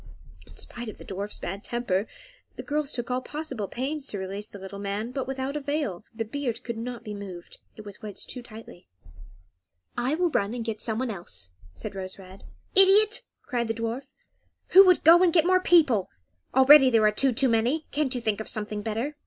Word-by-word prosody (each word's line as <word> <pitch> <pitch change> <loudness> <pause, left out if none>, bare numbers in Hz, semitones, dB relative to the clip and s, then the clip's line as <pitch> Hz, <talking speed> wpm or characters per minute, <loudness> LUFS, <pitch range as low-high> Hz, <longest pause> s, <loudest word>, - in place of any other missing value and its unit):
In - - -17
spite 240 -2 -4
of - - -10
the - - -12
dwarf's 200 +2 -5
bad 195 +3 -5
temper, 220 -4 -1 0.5
the - - -7
girls 295 -1 -1
took 240 -2 -4
all 250 +1 0
possible 270 -8 -5
pains 280 +5 -3
to 205 - -5
release 195 +2 -4
the - - -10
little 195 +1 -8
man, 205 +4 -3
but 260 0 -3
without 265 +1 -3
avail; 285 - -2
the 225 -1 -4
beard 245 0 -4
could 235 - -4
not 240 0 -6
be 210 -2 -6
moved, 190 -4 -9 0.2
it 215 - -11
was 205 +1 -10
wedged 210 -3 -7
too 250 - -6
tightly. 220 -6 -13 1.1
"I 250 +5 0
will 350 0 +1
run 205 0 0
and 235 -2 -4
get 220 -2 -3
someone 235 +2 -1
else," 95 - -7 0.2
said - - -6
Rose 190 -1 -6
Red. 190 0 -13 0.3
"Idiot!" 400 +3 +6 0.2
cried 240 -3 -2
the 225 - -2
dwarf. 230 +4 -3 0.6
"Who 385 - +9
would 365 - +4
go 335 +3 +8
and 365 -2 +5
get 330 -1 +4
more 370 0 +4
people? 295 - +4 0.5
Already 265 +1 +8
there 225 -3 +4
are 210 - +5
two 265 +5 +2
too 260 +3 +2
many. 245 +7 +1
Can't 285 -3 -1
you 245 - -2
think 215 -3 0
of - - -6
something 210 -1 -3
better?" 230 +8 -3
235 Hz, 200 wpm, -26 LUFS, 210-280 Hz, 1.1 s, Who